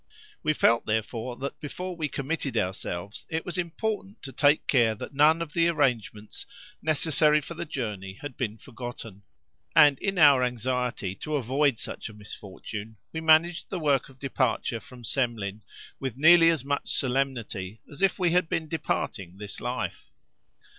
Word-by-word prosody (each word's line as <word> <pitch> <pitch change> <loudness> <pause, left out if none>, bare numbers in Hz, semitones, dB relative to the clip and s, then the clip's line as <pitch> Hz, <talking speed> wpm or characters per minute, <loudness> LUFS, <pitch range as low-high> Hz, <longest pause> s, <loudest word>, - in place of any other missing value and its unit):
We 155 - +2
felt, 115 -5 +3
therefore, 110 +2 -2
that 140 +4 -5
before 180 +5 -5
we 160 -3 -1
committed 140 +1 -2
ourselves 95 +1 -3
it 160 -1 -2
was 180 - -4
important 200 +4 -3
to 135 - -6
take 145 +2 +3
care 115 -5 +3
that 110 - -8
none 155 +4 +5
of 155 -2 -10
the 170 -1 +3
arrangements 120 - -1 0.3
necessary 155 -1 +3
for 150 +3 -8
the 170 - -5
journey 105 -9 -4
had 145 +3 -8
been 110 -3 -3
forgotten; 120 -5 -8 0.5
and 145 -4 +7
in 195 -1 -1
our 145 -5 +7
anxiety 125 -4 -1
to 155 +7 -3
avoid 135 0 +2
such - - -6
a 110 - -12
misfortune, 105 +1 -8 0.2
we 160 - -3
managed 160 +2 +4
the 190 - -3
work 145 -5 +1
of 130 - -17
departure 130 -3 0
from 125 +1 -14
Semlin 110 -5 -1 0.4
with 130 -3 -4
nearly 165 +3 +7
as 160 -6 0
much 140 0 -1
solemnity 120 -7 -1
as 145 +4 -10
if 195 -1 +3
we 180 -3 +2
had 180 -1 +2
been 160 -1 -1
departing 100 - -3
this 105 -1 -6
life. - - -4
135 Hz, 160 wpm, -27 LUFS, 115-160 Hz, 0.5 s, and